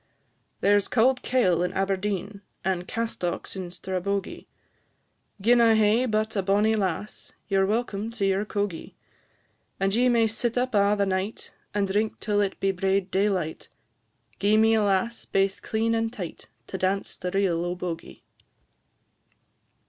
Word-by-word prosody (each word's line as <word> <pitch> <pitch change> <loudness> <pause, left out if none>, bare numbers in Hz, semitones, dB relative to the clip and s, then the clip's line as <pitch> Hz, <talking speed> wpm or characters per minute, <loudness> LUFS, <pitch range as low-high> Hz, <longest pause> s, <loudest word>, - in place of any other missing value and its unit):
There 205 +1 +5
's 200 - -4
cauld 255 +2 +3
kail 185 -10 +2
in 180 - -1
Aberdeen, 195 +1 -2 0.2
And 185 -1 -1
castocks 225 -7 -3
in 185 -2 -5
Strabogie; 190 +2 -3 0.9
Gin 235 +4 +4
I 225 -1 +5
hae 220 +3 +3
but 215 0 0
a 195 - +2
bonnie 205 +3 +2
lass, 200 -1 -3
Ye 195 - +1
're 190 - +3
welcome 215 -1 -1
to 215 -4 -1
your 195 +1 +1
cogie. 205 -5 -4 0.8
And 195 0 +1
ye 245 +3 +3
may 235 -2 +4
sit 225 +2 -1
up 250 0 0
a' 205 0 +4
the 200 - +2
night, 190 +3 -3 0.2
And 200 -1 +1
drink 210 +3 -1
till 205 -1 +1
it 195 -1 -2
be 195 - +2
braid 190 0 0
daylight; 190 -5 -1 0.7
Gi'e 205 +2 +3
me 220 +1 +5
a 220 - +3
lass 205 +3 0
baith 195 0 0
clean 225 +1 0
and 225 0 0
tight, 185 -8 -7 0.2
To 190 - -6
dance 190 +2 -1
the 180 - -4
reel 180 -3 +1
o' 175 0 -2
Bogie. 175 -2 -6
200 Hz, 155 wpm, -26 LUFS, 190-220 Hz, 0.9 s, There